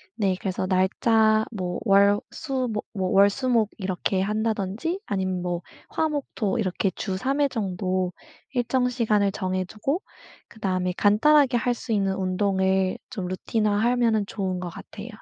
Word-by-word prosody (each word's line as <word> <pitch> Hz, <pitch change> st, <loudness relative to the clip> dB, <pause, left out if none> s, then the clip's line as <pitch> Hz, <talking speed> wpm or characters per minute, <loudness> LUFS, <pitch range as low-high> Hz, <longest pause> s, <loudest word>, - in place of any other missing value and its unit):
네. 195 Hz, -4 st, +1 dB
그래서 185 Hz, -1 st, -2 dB
날짜 215 Hz, +4 st, +3 dB
뭐 180 Hz, -5 st, -3 dB
월, 200 Hz, 0 st, +5 dB
수 265 Hz, -4 st, -2 dB
뭐 210 Hz, -1 st, -3 dB
뭐 185 Hz, -2 st, -1 dB
월, 200 Hz, +1 st, +6 dB
수, 255 Hz, +5 st, -3 dB
목 225 Hz, -4 st, +3 dB
이렇게 190 Hz, -1 st, -1 dB
한다든지 215 Hz, -, -1 dB
아님 185 Hz, -2 st, -1 dB
뭐 175 Hz, -1 st, -2 dB, 0.3 s
화, 315 Hz, -1 st, 0 dB
목, 290 Hz, -2 st, -3 dB
토 215 Hz, 0 st, 0 dB
이렇게 190 Hz, -1 st, 0 dB
주 190 Hz, -3 st, -3 dB
3 270 Hz, +8 st, -1 dB
회 285 Hz, -, +4 dB
정도 185 Hz, -5 st, -2 dB, 0.4 s
일정 250 Hz, 0 st, +1 dB
시간을 215 Hz, -5 st, +1 dB
정해두고 195 Hz, -, -2 dB, 0.5 s
그다음에 185 Hz, -4 st, -2 dB
간단하게 265 Hz, +6 st, +4 dB
할 245 Hz, +1 st, +1 dB
수 230 Hz, -1 st, -4 dB
있는 195 Hz, -2 st, +1 dB
운동을 190 Hz, 0 st, +1 dB
좀 190 Hz, -6 st, -4 dB
루틴화 210 Hz, +3 st, 0 dB
하면은 230 Hz, -2 st, +2 dB
좋은 185 Hz, -3 st, -3 dB
것 180 Hz, -, -4 dB
같아요. 205 Hz, +5 st, -10 dB
205 Hz, 280 characters per minute, -25 LUFS, 185-230 Hz, 0.5 s, 월